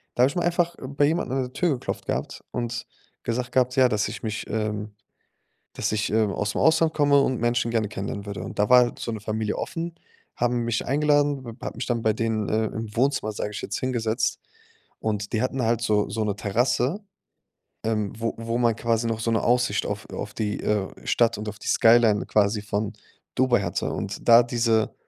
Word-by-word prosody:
Da 120 - +4
habe 130 - +5
ich - - -8
mal 175 - 0
einfach 175 0 +1
bei 140 +2 +1
jemanden 155 -3 0
an 135 0 +1
der 125 0 -8
Tür 180 - +1
geklopft 130 - -4
gehabt - - -3
und 120 -1 -3 0.4
gesagt 125 +1 -2
gehabt, 125 0 +2
ja, 130 -1 +7
dass 105 -3 +1
ich - - -8
mich, 110 0 -3
ähm 105 -1 -3 0.8
dass - - -1
ich, 110 0 0
ähm, 110 -2 +2
ausm 105 0 -2
Ausland 160 0 +4
komme 145 -2 +4
und 130 -2 +1
Menschen 120 0 +1
gerne 115 -2 +1
kennenlernen 100 0 -5
würde. 100 -3 -5
Und 95 - -7
da 105 0 +3
war 125 - +9
halt 120 - -2
so - - -3
'ne 110 - -5
Familie 110 0 -2
offen, 170 0 -4 0.4
haben 120 0 +1
mich 115 -1 -1
eingeladen, 145 -1 +2
w 115 - -7
hat - - -4
mich 125 - -4
dann 120 -2 -1
bei 110 -1 +3
denen, 110 -1 -1
äh, 110 +1 +1
im 110 0 -6
Wohnzimmer, 130 -3 +1
sage 105 0 -4
ich 105 - -5
jetzt, - - -3
hingesetzt. 120 -2 -1 0.6
Und 105 -2 -2
die 110 - +1
hatten 130 0 -1
halt 115 0 +1
so 105 -3 +1
so 110 +2 -1
'ne 105 -1 -1
Terrasse, 120 - +1 0.9
ähm, 105 -2 0
wo 115 0 -1
wo 115 +1 -2
man 120 -2 +3
quasi 115 0 0
noch 115 -1 -1
so 115 - 0
'ne 110 - +2
Aussicht 125 +1 +2
auf, - - -4
äh - - -6
auf - - -5
die, 105 -1 -2
äh, 105 -3 0 0.2
Stadt 115 -2 +3
und 105 - -6
auf 105 0 -10
die - - -9
Skyline 115 -2 +5
quasi 105 0 +2
von 105 0 -2 0.4
Dubai 125 -4 +3
hatte. 85 -2 -2
Und - - -5
da 115 +1 +9
diese 115 -2 +1
115 Hz, 215 wpm, -25 LUFS, 105-125 Hz, 0.9 s, war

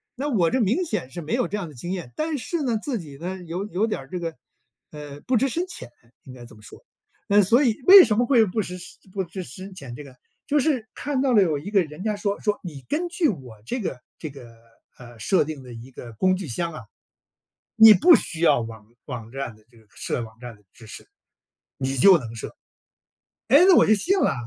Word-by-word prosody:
那 275 +3 -3
我 185 - +2
这 260 - 0
明 230 - +1
显 135 - -4
是 175 - -6
没 160 +7 -5
有 245 0 +1
这 210 - -3
样 195 -4 -5
的 150 - -14
经 175 +9 -6
验， 175 -10 -5
但 310 -1 -2
是 305 +6 -3
呢， 240 -4 0
自 265 -2 -3
己 145 -5 -11
呢 180 +5 -5
有 175 +4 -4
有 210 +1 0
点 215 -10 -3
儿 135 - -15
这 180 - -4
个， 165 -1 -4 0.6
呃， 145 -1 -10
不 250 0 +1
知 265 +5 +2
深 340 +7 -2
浅 365 - -8 0.3
应 130 - -12
该 120 -2 -12
这 115 - -15
么 105 - -18
说。 - - -14 0.4
那， 205 +1 +5
所 235 +9 +4
以 235 -5 +2
为 385 0 +11
什 210 -8 0
么 240 - +3
会 240 -3 +4
不 210 +3 -2
知 180 -2 -6 0.4
不 195 - -1
知 180 +2 -7
深 190 +2 -10
浅， 135 -8 -9
这 150 - -9
个 135 -3 -14 0.3
就 295 - +2
是 260 -6 0
看 275 -1 -2
到 265 -2 +2
了 210 - +6
有 155 -5 0
一 170 +8 -7
个 200 -3 +3
人 155 +3 -9
家 215 -1 -1
说 205 -1 -2
说 210 -2 -1
你 155 -7 -8
根 330 +5 -1
据 345 -3 +1
我 125 - -8
这 250 - -3
个 155 - -4 0.2
这 155 - -6
个， 120 -4 -13 0.4
呃， 120 -2 -14
设 175 - +2
定 150 -2 -7
的 125 -1 -12
一 115 +3 -11
个 120 -2 -10
工 185 - +2
具 185 -2 -6
箱 170 +7 -3
啊， 155 - -8 1.0
你 220 -1 +10
不 340 - +7
需 160 - 0
要 165 - +4
网 110 -2 -8 0.2
网 120 -5 -7
站 135 -4 -5
的 110 - -25
这 120 - -21
个 110 - -23
设 120 - -4
网 110 -1 -11
站 120 -1 -9
的 105 - -24
知 115 - -15
识， 110 - -11 0.7
你 135 0 -2
就 190 +7 +8
能 115 -5 -8
设。 115 - -8 0.9
唉， 280 - +7
那 370 - +7
我 - - +6
就 215 - +5
信 365 - +1
了 - - +2
180 Hz, 260 characters per minute, -24 LUFS, -, 1.0 s, 为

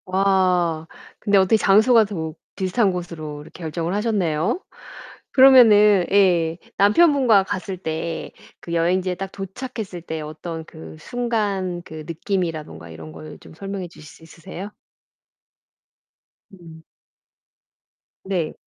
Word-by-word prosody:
와 185 -4 +1 0.3
근데 205 -2 +2
어떻게 190 +3 +4
장소가 220 +3 +5
더 160 -6 -5 0.2
비슷한 195 +2 +1
곳으로 165 -4 -6
이렇게 165 - -14
결정을 165 +2 -3
하셨네요. 205 - 0 0.7
그러면은 215 -8 +7
예 175 -5 +3 0.2
남편분과 240 - +4
갔을 190 -1 -5
때 160 -1 -4 0.3
그 170 - -7
여행지에 180 +2 +1
딱 190 +1 -6
도착했을 195 -1 -7
때 160 -1 -5
어떤 160 +2 -7
그 160 -1 -12
순간 205 -4 -2
그 155 -2 -9
느낌이라든가 165 - -4
이런 80 -1 -10
걸 150 - -11
좀 - - -15
설명해 195 +1 -6
주실 155 -2 -15
수 160 - -16
있으세요? 180 +4 -9 1.8
음. 165 -3 -14 1.4
네. 180 -5 -2
185 Hz, 245 characters per minute, -22 LUFS, 160-200 Hz, 1.8 s, 그러면은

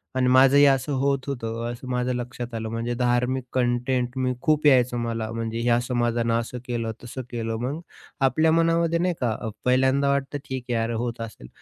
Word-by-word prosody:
आणि 130 -1 +2
माझंही 135 +3 +6
असं 135 +1 +2
होत 140 -1 0
होतं, 115 -4 -4
असं 120 +2 -9
माझ्या 125 0 0
लक्षात 120 0 -5
आलं. 110 -1 -3
म्हणजे 115 +1 -2
धार्मिक 125 +1 +1
कॉन्टेंट, 125 0 0
मी 130 -1 0
खूप 155 -1 +2
यायचं 125 -3 +4
मला. 115 -1 -3
म्हणजे 115 0 -3
ह्या 120 0 +3
समाजानं 120 -2 0
असं 120 +1 -5
केलं, 115 -2 -2
तसं 125 +2 -6
केलं. 115 -1 -3
मग, 140 +6 -3 0.5
आपल्या 160 +4 +2
मनामध्ये 165 0 +2
नाही 180 0 +1
का 120 -3 +1
अ, 110 - -3 0.2
पहिल्यांदा 130 +2 +3
वाटतं 140 +1 -1
ठीक 130 -1 -4
आहे - - 0
यार 115 +1 -1
होत 120 -1 -4
असेल. 110 - -8
125 Hz, 185 wpm, -24 LUFS, 120-135 Hz, 0.5 s, माझंही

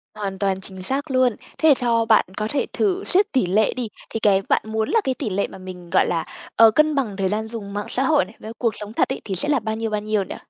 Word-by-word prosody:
Hoàn 195 -2 -4
toàn 190 -1 0
chính 190 -1 -9
xác 275 +5 -2
luôn. 255 -3 +3 0.2
Thế 315 -2 +6
cho 230 -2 +1
bạn 220 -1 +4
có 215 0 -1
thể 285 - -1
thử 390 -1 0
xét 400 +2 +2
tỉ 255 -8 +2
lệ 205 +4 +2
đi, 245 -2 -3 0.2
thì 225 - -3
cái 200 -2 +3
bạn - - +3
muốn 220 0 -2
là 450 +1 +3
cái 265 - 0
tỉ 250 -6 -3
lệ 200 +1 0
mà - - -11
mình 185 -2 -10
gọi - - +3
là, 165 -2 -1 0.3
ờ, 225 -1 +7
cân 305 +3 +3
bằng 220 -8 -1
thời 190 -1 0
gian 220 +2 -2
dùng 205 -4 -7
mạng 205 0 -3
xã 260 - 0
hội 290 +1 +3
này, 220 - -16
với 220 - -8
cuộc 230 -4 0
sống 210 +1 -7
thật - - +1
ấy, 265 - -3
thì 195 -3 -3
sẽ 290 +11 -1
là 285 -4 +3
bao 220 0 -3
nhiêu, 225 0 -2
bao 210 -1 -1
nhiêu 210 -1 0
nhỉ? - - -7
220 Hz, 285 wpm, -22 LUFS, 200-260 Hz, 0.3 s, ờ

